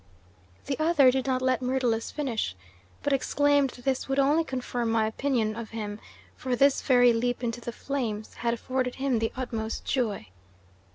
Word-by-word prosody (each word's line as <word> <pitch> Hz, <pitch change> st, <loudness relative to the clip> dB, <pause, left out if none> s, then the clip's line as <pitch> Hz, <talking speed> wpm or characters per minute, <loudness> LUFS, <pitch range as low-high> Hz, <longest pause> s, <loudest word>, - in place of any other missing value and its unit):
"The 275 Hz, +1 st, -3 dB
other 310 Hz, -5 st, +5 dB
did 260 Hz, 0 st, -1 dB
not 255 Hz, -1 st, 0 dB
let 255 Hz, -2 st, +2 dB
Myrtilus 250 Hz, -3 st, 0 dB
finish, 245 Hz, -, -2 dB, 0.5 s
but 285 Hz, -, +1 dB
exclaimed 285 Hz, +1 st, +2 dB
that 245 Hz, 0 st, -13 dB
this 270 Hz, 0 st, -1 dB
would 270 Hz, -, 0 dB
only 290 Hz, +4 st, +4 dB
confirm 250 Hz, -4 st, -3 dB
my 225 Hz, -1 st, +2 dB
opinion 220 Hz, -1 st, 0 dB
of 230 Hz, -1 st, -6 dB
him, 210 Hz, -2 st, -5 dB, 0.4 s
for 255 Hz, -1 st, -2 dB
this 275 Hz, +3 st, +4 dB
very 245 Hz, -3 st, +5 dB
leap 245 Hz, +2 st, -1 dB
into 240 Hz, 0 st, -2 dB
the 235 Hz, -, -5 dB
flames 230 Hz, -5 st, -4 dB
had 235 Hz, 0 st, -1 dB
afforded 255 Hz, +1 st, -2 dB
him 265 Hz, -3 st, 0 dB
the 225 Hz, 0 st, -1 dB
utmost 225 Hz, -4 st, -4 dB
joy. 215 Hz, -, -1 dB
250 Hz, 170 wpm, -27 LUFS, 230-270 Hz, 0.5 s, other